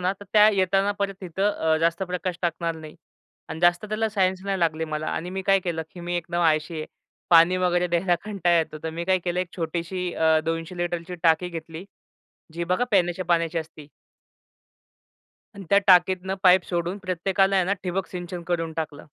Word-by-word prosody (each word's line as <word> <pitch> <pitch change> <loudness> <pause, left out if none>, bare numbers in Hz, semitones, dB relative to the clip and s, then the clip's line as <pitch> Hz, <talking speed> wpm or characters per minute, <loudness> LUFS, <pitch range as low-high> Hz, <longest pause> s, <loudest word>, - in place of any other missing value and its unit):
ना, 180 +1 +1
तर 200 +1 -13
त्या 210 0 +7
येताना 195 +1 +2
परत 200 -1 -1
तिथं 190 +3 -1
अ, 160 -5 +1
जास्त 165 +2 0
प्रकाश 180 -1 -3
टाकणार 170 -1 -1
नाही 155 -1 -11 0.5
अन् 160 - -6
जास्त 175 +2 +3
त्याला 215 +1 -1
सायन्स 190 -3 0
नाही 195 -1 -1
लागली 160 -1 0
मला 155 0 -4
आणि 175 +2 -3
मी 190 +1 -4
काय 195 +1 +4
केलं, 170 -3 -3
की 180 - -11
मी 175 +1 -3
एकदम 175 0 -3
आळशी 160 0 +1
आहे. 155 - -6 0.4
पाणी 170 +2 +6
वगैरे 180 -1 +1
द्यायला 175 +1 +2
कंटाळा 180 -5 +1
येतो, 155 -1 -2
तर 160 - -3
मी 170 +2 -5
काय 190 0 +2
केलं 175 0 -2
1 185 - -3
छोटीशी 170 +2 -3
अ, 160 -1 +3
200 165 +2 -3
लीटरची 175 0 -3
टाकी 170 +1 +3
घेतली. 165 +1 -8 0.7
जी 170 +1 -3
बघा 185 +8 +1
पिण्याच्या 180 -2 +1
पाण्याची 170 -1 +1
असती. 155 -2 -9 1.7
अन् 195 - -9
त्या 200 - +6
टाकीतनं 185 +1 +4
पाईप 185 -1 +6
सोडून 175 +2 -2
प्रत्येकाला 190 +1 +1
आहे 185 - +3
ना 190 - 0
ठिबक 185 +1 -2
सिंचन 175 -1 -6
करून 165 -2 -1
टाकलं. 155 -2 -5
175 Hz, 190 wpm, -24 LUFS, 165-190 Hz, 1.7 s, त्या